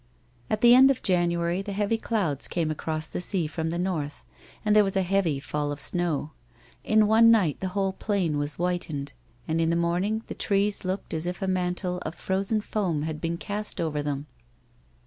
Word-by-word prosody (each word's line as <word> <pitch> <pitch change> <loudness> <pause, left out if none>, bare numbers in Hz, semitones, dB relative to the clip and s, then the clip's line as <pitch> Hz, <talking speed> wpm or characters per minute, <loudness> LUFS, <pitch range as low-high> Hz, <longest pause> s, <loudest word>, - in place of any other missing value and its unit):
At 215 - -1
the 240 0 +8
end 260 +2 +8
of 270 - 0
January, 175 0 +1
the 200 0 -5
heavy 210 +3 0
cloiids 190 - -1
came 165 -3 -1
across 155 +1 -3
the - - -4
sea 180 -2 0
from 160 +1 -3
the 170 - -2
north, 165 -6 -3 0.4
and 210 0 +3
there 210 - +7
was 195 -1 -1
a 190 - +3
heavy 180 -6 +1
fall 145 +1 -3
of 145 - -5
snow. 165 -4 -1 0.5
In 215 0 +4
one 225 +2 +6
night 200 -10 +3
the 190 - -2
whole 195 -1 +1
plain 185 -7 -1
was 145 0 -1
whitened, 170 -5 -3 0.3
and, 160 +1 0
in 165 - +2
the 170 - +2
morn 170 +1 +1
ing, 220 +2 -1
the - - -6
trees 200 0 0
looked 185 +1 -3
as 160 +1 -1
if 180 0 -3
a - - -1
mantle 180 0 -1
of 175 - -6
frozen 195 +3 0
foam 180 -9 -1
had 155 -1 -4
been 170 0 -2
cast 210 +3 -4
over 155 -3 -1
them. 145 -1 -3
180 Hz, 205 wpm, -26 LUFS, 160-200 Hz, 0.5 s, the